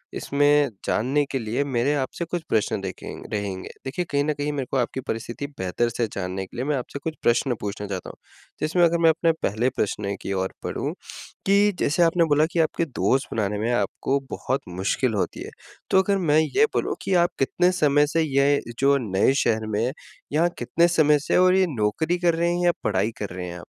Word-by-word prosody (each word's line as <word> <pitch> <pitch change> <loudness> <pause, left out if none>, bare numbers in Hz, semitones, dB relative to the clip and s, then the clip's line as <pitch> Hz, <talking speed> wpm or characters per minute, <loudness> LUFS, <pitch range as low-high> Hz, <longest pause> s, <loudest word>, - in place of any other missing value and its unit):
इसमें 145 0 +3 0.2
जानने 135 +6 +1
के 135 - -1
लिए 115 +5 -1
मेरे 135 +1 0
आप 135 -2 0
से 170 - -2
कुछ 170 0 -3
प्रश्न 105 -2 +1
देखें 95 -1 -7 0.2
रहेंगे। 100 -3 -3 0.2
देखिए 160 +7 -2
कहीं 140 0 +2
न 150 0 0
कहीं 145 +1 -2
मेरे 135 -3 -2
को 135 - +1
आपकी 125 +1 -1
परिस्थिति 115 +5 -4
बेहतर 95 +6 0
से 115 0 -1
जानने 95 0 -3
के 95 - -14
लिए 130 - -2
मैं 150 - 0
आपसे 135 +3 -6
कुछ 160 -1 -3
प्रश्न 120 +1 +2
पूछना 105 0 -4
चाहता 95 -2 -5
हूँ, - - -11 0.4
जिसमें 170 +3 +2
अगर 170 0 +4
मैं 165 - +7
अपने 165 +1 +3
पहले 115 +6 +1
प्रश्न 100 -4 -2
की 100 - -3
ओर 95 0 -2
बढ़ूँ - - -3 0.5
कि, 200 +1 +4
जैसे 165 +4 +2
आपने 170 0 +3
बोला 150 0 +3
कि 170 - -1
आपके 165 +1 +1
दोस्त 135 -1 0
बनाने 105 -2 -1
में 115 +3 0
आपको 120 +6 0
बहुत 130 +2 -2 0.2
मुश्किल 110 +5 0
होती 100 - -2
है। - - -8 0.4
तो 190 - +5
अगर 200 +1 +1
मैं 155 -5 +3
ये 400 - +3
बोलूँ - - 0
कि 195 - -1
आप 175 - -1
कितने 180 +7 +2
समय 145 -3 +3
से 165 +2 +1
ये 140 -1 +3 0.2
जो 140 +1 +4
नए 110 +1 +2
शहर 110 -1 +1
में, 110 +4 0 0.4
यहाँ 170 +3 +3
कितने 170 +1 +2
समय 150 -3 +4
से 150 - 0
और 185 0 +5
ये 190 -1 +4
नौकरी 120 +11 0
कर 175 -2 +3
रहे 170 +1 +1
हैं 175 - -1
या 175 - +5
पढ़ाई 100 +2 +1
कर 105 - -3
रहे 90 -1 -5
हैं 90 0 -7
आप? - - -12
140 Hz, 215 wpm, -24 LUFS, 110-160 Hz, 0.5 s, मैं